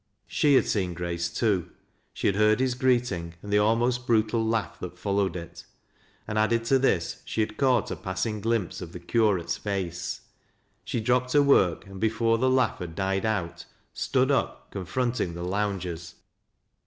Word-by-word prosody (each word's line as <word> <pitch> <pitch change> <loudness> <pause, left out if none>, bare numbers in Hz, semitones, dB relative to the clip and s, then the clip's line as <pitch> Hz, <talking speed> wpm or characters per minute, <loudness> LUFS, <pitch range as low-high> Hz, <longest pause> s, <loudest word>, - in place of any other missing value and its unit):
She 145 -2 +3
had - - +5
seen 90 -4 -1
Grace 85 0 -2
too; 95 -7 0 0.4
she - - -6
had 100 - +3
heard 105 +2 +4
his 130 -1 +1
greeting 120 -10 0
and 105 0 -4
the 105 - +5
almost 120 +3 +1
brutal 115 0 +2
laugh 110 -4 -1
that - - -7
followed 100 -3 0
it; 85 -2 -8 0.6
and, 105 0 -1
added 115 +2 +2
to 135 +3 +3
this, 95 -11 0
she 110 - -2
had 110 0 -2
caught 130 -5 +2
a - - -2
passing 95 +3 -3
glimpse 115 -5 -1
of 85 -2 -8
the 90 - -7
curate's 95 -1 +1
face. 95 -4 -3 0.6
She 115 - -2
dropped 125 +2 +1
her 145 -1 +6
work, 95 -11 +3
and, 95 0 -10
before 115 +1 +1
the 130 +1 +3
laugh 130 -2 +2
had 85 -3 -6
died 95 +2 0
out, 85 -5 -2 0.3
stood - - +1
up - - -1
confronting 100 -1 -2
the 85 - -5
loungei 95 -2 -1
s. 85 0 -10
105 Hz, 175 wpm, -27 LUFS, 90-115 Hz, 0.6 s, her